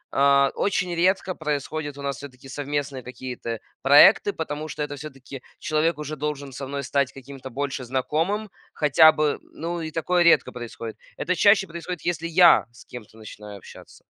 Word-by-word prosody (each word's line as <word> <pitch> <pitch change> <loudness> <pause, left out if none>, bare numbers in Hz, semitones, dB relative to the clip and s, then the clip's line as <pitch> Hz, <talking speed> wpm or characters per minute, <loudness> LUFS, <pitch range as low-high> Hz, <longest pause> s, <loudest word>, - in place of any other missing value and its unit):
а, 140 0 +4
очень 180 -3 0
редко 185 +2 +1
происходят 145 0 -4
у 140 - -8
нас 140 -2 -3
всё-таки 135 -2 -12
совместные 140 -1 -4
какие-то 125 -2 -6 0.2
проекты, 150 +9 +7
потому 155 -1 -5
что 150 - -4
это 145 0 -5
всё-таки 135 -2 -10 0.2
человек 155 +2 0
уже 150 0 -5
должен 145 -1 -4
со 135 0 -6
мной 140 0 -4
стать 140 0 0
каким-то 135 0 -10
больше 135 0 -4
знакомым, 160 - -1 0.2
хотя 155 +1 +6
бы, 155 - -1
м. - - -9
Ну 170 +1 -4
и 155 - -5
такое 175 +2 +1
редко 170 - +4
происходит. 115 -2 -8 0.2
Это 180 - -1
чаще 200 0 +4
происходит, 170 +1 -6
если 165 -1 -1
я 170 +1 +6
с 120 - -17
кем-то 115 -2 -12
начинаю 105 -1 -10
общаться. - - -15
145 Hz, 170 wpm, -24 LUFS, 135-165 Hz, 0.2 s, проекты